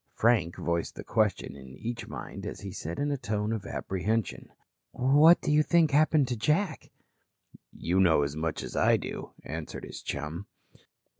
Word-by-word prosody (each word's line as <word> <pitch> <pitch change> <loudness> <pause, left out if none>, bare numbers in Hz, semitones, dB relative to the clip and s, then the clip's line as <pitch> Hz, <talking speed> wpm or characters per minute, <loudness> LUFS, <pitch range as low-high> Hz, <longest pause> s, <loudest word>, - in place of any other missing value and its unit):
Frank 110 -7 +2
voiced 85 -1 -2
the - - -7
question 105 -8 0
in 65 -1 -12
each 120 0 -5
mind - - -7
as - - -6
he 100 -1 -6
said 85 -1 -5
in 145 +1 0
a 140 - 0
tone 105 -1 -1
of 110 -3 -4
apprehension: 100 +2 -2 0.4
"What 145 +7 +6
do - - 0
you 150 0 +5
think 165 -1 +3
happened 150 -1 +4
to 125 - 0
Jack?" 155 - 0 0.8
"You 90 +3 -1
know 80 -6 +5
as 70 +1 -3
much 80 0 -2
as - - -7
I - - +4
do," - - -7
answered 80 0 -6
his - - -8
chum. 85 +6 -5
110 Hz, 170 wpm, -29 LUFS, 85-140 Hz, 0.8 s, What